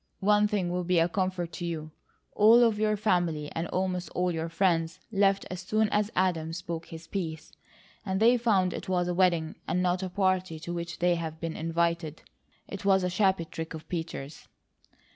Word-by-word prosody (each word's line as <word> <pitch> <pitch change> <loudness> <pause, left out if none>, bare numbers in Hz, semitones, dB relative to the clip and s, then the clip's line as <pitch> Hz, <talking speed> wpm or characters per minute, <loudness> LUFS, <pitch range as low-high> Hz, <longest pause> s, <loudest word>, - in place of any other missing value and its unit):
One 210 +1 +4
thing 195 -4 -1
will 180 0 -1
be 180 0 +1
a 165 0 +4
comfort 185 -2 -2
to 175 +2 -5
you. 155 -2 -5 0.4
All 225 +3 +7
of 225 -3 +2
your 215 0 +2
family, 175 -7 0
and 165 +1 -3
almost 180 -2 -2
all 180 0 +1
of - - -1
your 165 0 -3
friends, 165 -2 +1
left 195 -1 +2
as 185 0 -5
soon 215 +3 +1
as 210 0 +1
Adam 165 -4 0
spoke 170 -1 -5
his 165 0 -9
piece, 165 -4 -5 0.5
and 190 -2 -1
they 235 +3 +6
found 205 -7 +2
it - - -6
was 180 -1 +1
a 180 - 0
wedding 175 -3 +1
and 180 +2 0
not 180 +1 +1
a 190 - -3
party 185 -3 0
to 175 - -5
which 170 0 -5
they'd 170 -3 0
been 165 -1 -4
invited. 165 -1 -1 0.4
It 200 - -7
was 190 -1 +4
a 180 - 0
shabby 190 -2 +2
trick 160 0 -6
of 160 - -10
Peters." 160 -4 -5
180 Hz, 195 wpm, -28 LUFS, 165-190 Hz, 0.5 s, All